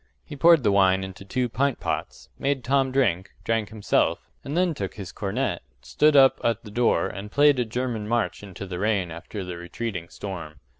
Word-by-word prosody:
He 150 - -8
poured 165 0 +6
the 105 - +3
wine 95 -1 +4
into 95 0 -8
two 125 +5 -1
pint 135 +3 0
pots, - - -4
made 135 -2 0
Tom 135 0 +2
drink, 100 -9 +1
drank 115 -2 0
himself, 110 -2 0
and 145 +4 -4
then 180 -2 +2
took 100 -9 -5
his 100 -3 -7
cornet, 105 -1 -2 0.2
stood 150 0 +3
up 135 -1 +6
at 115 -1 0
the 105 - -10
door, 120 +2 +2
and 100 +1 -7
played 145 -1 +5
a 125 - +1
German 115 -2 -3
march 120 0 -1
into 100 -1 -8
the 90 -2 -5
rain 100 -4 0
after 90 +5 -7
the 90 -1 -6
retreating 85 0 -5
storm. 85 -6 -7
110 Hz, 195 wpm, -25 LUFS, 95-130 Hz, 0.2 s, poured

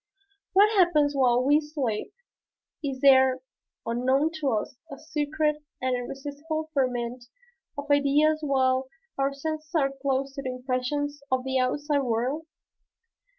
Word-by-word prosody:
What 420 +3 +5
happens 310 -6 +4
while 250 -2 +3
we 290 +3 +4
sleep? 280 -8 -3 0.7
Is 270 -2 -3
there, 265 -2 +5 0.4
unknown 260 +6 +1
to 285 -3 0
us, 220 +1 -2 0.2
a 275 - -7
secret 300 0 -1 0.2
and 255 -1 0
irresistible 290 +5 -5
ferment 245 -2 -1 0.5
of 285 - -4
ideas 290 +2 +3
while 260 -2 +1 0.3
our 275 +1 +2
senses 310 +3 -5
are 275 -4 +2
closed 270 0 -1
to 275 - -5
the 255 -2 -4
impressions 270 +3 -2
of 260 -1 +1
the 265 0 0
outside 285 +3 0
world? 260 +5 -1
275 Hz, 130 wpm, -26 LUFS, 255-300 Hz, 0.7 s, What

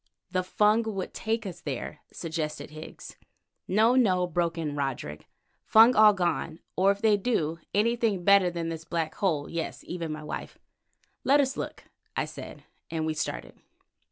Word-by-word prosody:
"The 185 0 +1
Fung 210 +4 +3
would 190 - -4
take 225 0 -2
us 185 -4 -7
there," 145 +1 -5
suggested 160 -3 -4
Higgs. 155 +1 -10 0.5
"No, 220 +5 +4
no," 185 -8 +3
broke 170 -1 -1
in 150 -3 -3
Roderick, 130 - -4 0.4
"Fung 230 +3 +7
all 215 -1 +8
gone, 175 -3 -1 0.2
or 190 +2 +4
if 200 +2 0
they 215 -2 +5
do, 165 -7 -1
anything 220 -3 +1
better 200 -1 +6
than 170 -1 -3
this 165 -1 -5
black 165 -1 -2
hole, 155 -7 0
yes, 170 -1 -4
even 170 -3 -4
my 155 0 -6
wife." 150 - -6 0.7
"Let 280 +2 +5
us 270 -1 +1
look," - - -5 0.3
I - - 0
said, - - -9 0.3
and 160 -1 -2
we 160 - 0
started. - - -4
175 Hz, 160 wpm, -28 LUFS, 160-210 Hz, 0.7 s, all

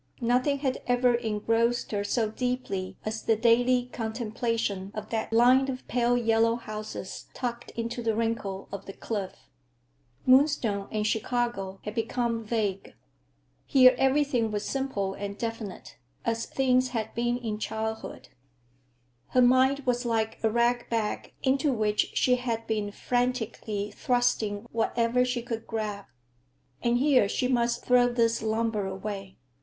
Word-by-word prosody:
Nothing 250 +4 +2
had 270 -2 -2
ever 245 0 +3
engrossed 230 +1 0
her 205 -1 -1
so 215 +1 0
deeply 245 -6 -3
as 220 +1 -3
the 225 - +2
daily 245 +2 +3
contemplation 225 -3 -2
of 215 0 -6
that 225 -1 -2
line 250 +4 +5
of 255 -1 -5
pale 245 0 +2
yellow 230 -1 +3
houses 215 -4 -7
tucked 240 -2 -4
into 235 +1 -3
the 225 -2 0
wrinkle 220 -4 -2
of 200 0 -7
the 195 - -7
cliff. 200 -3 -4 0.9
Moonstone 255 -7 +3
and 215 -1 -1
Chicago 220 -3 -1
had 210 - -5
become 230 0 -1
vague. 210 -3 -2 0.7
Here 255 -1 +7
everything 270 -4 +2
was 210 -1 -3
simple 265 -8 -2
and 200 0 -6
definite, 225 -4 -6 0.3
as 230 0 -1
things 255 -1 +2
had 220 -1 -3
been 240 +1 0
in 220 -4 -4
childhood. 220 +1 -4 1.0
Her 255 - +3
mind 260 +3 +4
was 245 -2 0
like 225 -2 -1
a 220 - +4
ragbag 235 -1 0
into 275 +2 +2
which 215 -3 +1
she 250 -1 +4
had 230 -2 -3
been 210 -2 -2
frantically 225 -4 -2
thrusting 225 -3 0
whatever 230 +2 +1
she 245 -1 -1
could 230 -2 -5
grab. 210 -3 -3 0.8
And 235 0 +2
here 255 -6 +4
she 250 - 0
must 240 -2 0
throw 245 -1 +4
this 230 -1 +1
lumber 220 -2 0
away. 195 0 -6
230 Hz, 140 wpm, -28 LUFS, 215-245 Hz, 1.0 s, Here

